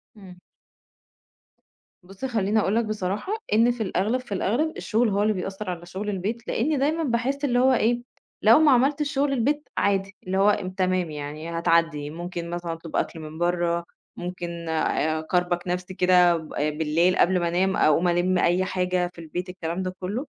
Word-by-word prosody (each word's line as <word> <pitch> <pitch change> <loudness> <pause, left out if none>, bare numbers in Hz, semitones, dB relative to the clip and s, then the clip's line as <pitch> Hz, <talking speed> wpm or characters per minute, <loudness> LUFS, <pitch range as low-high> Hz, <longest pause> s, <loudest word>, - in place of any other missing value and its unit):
امم. 190 -4 -13 1.6
بُصّ، 195 +7 -8
خلّيني 220 -4 +1
أقول 205 0 +1
لك 230 0 +2
بصراحة 215 - -3 0.2
إن 230 +3 +5
في 240 -2 -3
الأغلب، 210 +6 0
في 250 - -18
الأغلب 240 +12 0
الشغل 230 +1 +1
هو 200 0 +1
اللي 215 0 +2
بيأثّر 195 +1 -5
على 175 -1 -5
شُغل 190 +4 -5
البيت 210 +4 -3
لأن 285 +4 0
دايمًا 310 +4 +1
باحس 270 +2 0
اللي 245 -3 +2
هو 260 +1 +5
إيه، 240 0 +2 0.4
لو 225 +6 +7
ما 310 -2 +5
عملتش 285 +4 +2
شُغل 280 0 +1
البيت 290 +4 0
عادي، 195 -1 0
اللي 185 +1 -2
هو 195 -2 +2
تمام 185 -3 0
يعني، 150 +2 -6
هتعدّي 165 -3 +1
ممكن 170 +1 -6
مثلًا 175 -1 -4
أطلُب 165 0 -9
أكْل 165 - -1
من 155 0 -8
برّه، 175 0 0 0.3
ممكن 175 -2 -5
آآ 160 0 0
اكربج 175 +2 0
نفسي 180 +1 -3
كده 180 -1 +4
ب 160 -1 -9
بالليل 155 +4 +1
قبل 180 +1 +3
ما 170 - 0
أنام، 185 +3 +1
أقوم 160 +4 +3
ألِمّ 175 +1 +2
أي 180 +2 +2
حاجة 180 -1 0
في - - -14
البيت، 175 +3 -5
الكلام 180 0 -4
ده 185 0 -4
كلّه، 205 +9 -3
185 Hz, 175 wpm, -25 LUFS, 175-225 Hz, 1.6 s, لو